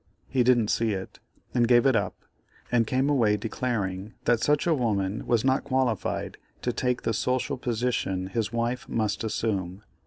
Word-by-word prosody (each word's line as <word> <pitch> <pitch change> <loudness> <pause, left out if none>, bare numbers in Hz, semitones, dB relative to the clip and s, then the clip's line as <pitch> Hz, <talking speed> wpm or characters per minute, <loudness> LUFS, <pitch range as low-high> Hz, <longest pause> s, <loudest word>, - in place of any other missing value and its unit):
He 130 - +1
didn't 120 -3 +3
see 115 -2 +1
it, 95 -1 -6 0.3
and 120 -2 +3
gave 120 +1 +5
it 135 -3 +4
up, 100 -4 -2 0.5
and 115 -2 +3
came 130 +3 +1
away 115 -8 +3
declaring 105 -4 -3
that 120 -2 +3
such 150 +4 +2
a 170 - +3
woman 105 -7 -1
was 120 0 +2
not 130 +1 +2
qualified 130 -1 -1 0.2
to 125 - 0
take 125 0 -1
the 115 - 0
social 130 +5 0
position 115 -6 -1
his 105 +3 -2
wife 120 +2 -2
must 110 -2 -1
assume. 100 -3 -2
115 Hz, 165 wpm, -27 LUFS, 105-125 Hz, 0.5 s, gave